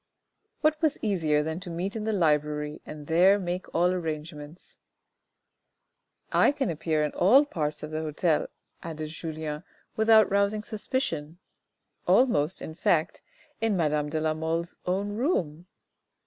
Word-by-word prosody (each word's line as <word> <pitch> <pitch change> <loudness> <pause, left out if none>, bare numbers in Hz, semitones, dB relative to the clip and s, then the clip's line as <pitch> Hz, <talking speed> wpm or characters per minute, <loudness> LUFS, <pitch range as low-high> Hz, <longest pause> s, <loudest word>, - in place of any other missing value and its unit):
What 310 0 +2
was 315 -3 +2
easier 160 -8 +1
than 160 +2 -3
to 185 -1 -8
meet 180 +5 -3
in 215 -1 -3
the 220 - 0
library, 150 -4 0
and 150 -1 -8
there 180 +6 +5
make 180 -1 -4
all 175 +2 +3
arrangements? 155 -2 -6 0.8
" - - -48
I - - +6
can 280 -10 -1
appear 155 -1 0
in 150 - -1
all 255 +11 +5
parts 155 - -3
of 150 - -6
the 155 0 -2
hotel," 155 +1 0 0.3
added 155 -2 -6
Julien, 155 -1 -5 0.2
" - - -39
without 220 -1 +6
rousing 200 +1 +1
suspicion 175 - -3 0.7
almost, 185 - +3
in 160 - -6
fact, 160 0 0 0.4
in 225 -3 +1
madame 150 -3 0
de 155 +1 -1
la 155 0 +1
Mole's 165 +2 -3
own 195 +3 0
room." 180 - -1
165 Hz, 150 wpm, -27 LUFS, 155-200 Hz, 0.8 s, I